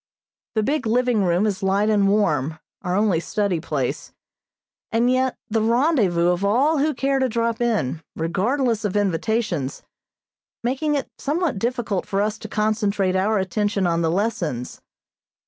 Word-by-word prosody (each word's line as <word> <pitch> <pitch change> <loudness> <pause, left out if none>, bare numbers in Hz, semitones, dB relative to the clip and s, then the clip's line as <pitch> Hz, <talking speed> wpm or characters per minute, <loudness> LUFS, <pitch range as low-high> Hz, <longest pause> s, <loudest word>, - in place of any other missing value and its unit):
The 215 - +2
big 285 0 0
living 240 -3 +2
room 175 +3 +2
is 205 -3 -1
light 195 +2 +2
and 205 -2 +3
warm, 160 -8 +1 0.2
our 180 -1 -1
only 200 -4 +2
study 200 0 -1
place, 145 -6 -3 0.8
and 235 +2 +2
yet 255 0 +1
the 220 -1 0
rendezvous 225 - +2
of 180 +2 0
all 270 +10 +3
who 300 +2 +1
care 275 0 +1
to 260 -1 +1
drop 230 0 -1
in, 205 - 0
regardless 225 - 0
of 210 -1 -1
invitations, 195 - -1 0.8
making 275 +5 0
it 280 - -2
somewhat 300 - -1
difficult 230 -4 -2
for 195 - -1
us 210 +1 -1
to 220 - -8
concentrate 210 -3 0
our 205 +3 +2
attention 200 +1 0
on 170 -1 +1
the 165 - +1
lessons. 170 - -2
210 Hz, 150 wpm, -22 LUFS, 185-240 Hz, 0.8 s, and